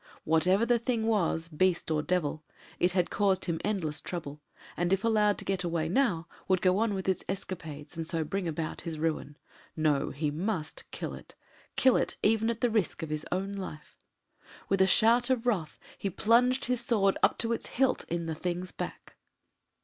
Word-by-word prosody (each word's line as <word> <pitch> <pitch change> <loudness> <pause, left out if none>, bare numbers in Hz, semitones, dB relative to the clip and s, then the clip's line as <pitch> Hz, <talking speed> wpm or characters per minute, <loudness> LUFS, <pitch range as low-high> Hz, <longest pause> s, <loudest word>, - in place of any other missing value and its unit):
Whatever 180 +7 +3
the 240 0 +3
thing 230 -1 -1
was 180 -7 +1
beast 170 +1 +1
or 155 -1 +2
devil 155 -3 -1 0.4
it 180 0 +3
had 180 -2 +1
caused 195 -2 +2
him 170 -3 -2
endless 165 -8 -1
trouble, 150 -4 -6 0.3
and 175 +1 0
if 195 +2 +2
allowed 210 -2 +3
to - - -6
get 190 -2 0
away 165 -2 -1
now, 175 -5 +1 0.2
would 185 -1 +3
go 185 +2 +3
on 225 -2 +1
with 190 -1 -4
its 190 - 0
escapades, 160 -6 -5
and 165 -1 -4
so 165 -1 -1
bring 190 +3 -2
about 160 0 -3
his 165 -2 -5
ruin. 155 -2 -2 0.4
No! 155 -3 +2
he 150 +1 -2
must 165 0 -3
kill - - -5
it. - - -12 0.4
Kill 260 -1 +5
it - - -1
even 225 +1 +3
at 235 -1 -2
the 245 - +3
risk 210 -7 0
of 155 - -5
his 155 0 -3
own 195 +2 -1
life. 185 -6 -7 0.7
With 195 -1 +2
a 190 - +6
shout 235 +6 +5
of 250 -2 +1
wrath 185 -11 0 0.2
he 200 - -1
plunged 240 +7 +3
his 250 0 0
sword 205 -5 +2
up - - +4
to 230 +1 0
its - - -4
hilt 265 +1 +1
in 170 0 -3
the 165 - -2
thing's 180 +2 -3
back. - - -7
185 Hz, 195 wpm, -29 LUFS, 160-215 Hz, 0.7 s, a